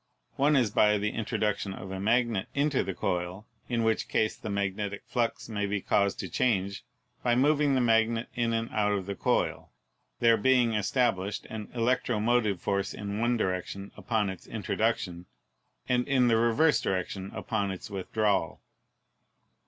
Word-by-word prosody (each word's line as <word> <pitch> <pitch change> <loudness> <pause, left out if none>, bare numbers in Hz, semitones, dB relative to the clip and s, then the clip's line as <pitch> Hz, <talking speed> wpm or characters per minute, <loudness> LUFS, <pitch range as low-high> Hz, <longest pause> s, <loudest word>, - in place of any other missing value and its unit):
One 145 +2 +3
is 120 -6 +3
by 105 0 +4
the 105 +1 -1
introduc 105 -2 -1
tion 95 +1 -4
of 95 0 -8
a 95 - -4
magnet 115 -1 +1
into 145 -1 +2
the 95 - -4
coil, 90 +4 -2 0.2
in 120 -2 0
which 110 0 +1
case 110 - +1
the - - -7
magnetic 100 0 -2
flux 120 -2 -1
may 105 -2 -2
be 100 0 -1
caused 100 0 +1
to 95 - -5
change 100 -1 0 0.4
by 120 -1 +2
moving 145 +1 +3
the 130 - +2
magnet 115 0 +2
in 120 -1 0
and 115 0 -1
out 105 -1 +1
of 100 -2 -2
the 100 - -3
coil, - - -1 0.5
there 115 -1 +5
being 120 +1 +3
established 105 -2 0
an 110 -2 -6
electromotive 120 -3 +1
force 100 +2 -1
in 100 0 -4
one 120 +1 +2
direction 95 0 -3
upon 105 -4 -1
its 95 - -11
introduction, 105 -5 -2 0.6
and 125 0 +1
in 130 -3 +3
the 115 - +4
reverse 120 +7 +3
direction 95 +1 -2
upon 100 -3 -1
its 95 +2 -7
withdrawal. 100 +1 0
110 Hz, 160 wpm, -28 LUFS, 100-120 Hz, 0.6 s, there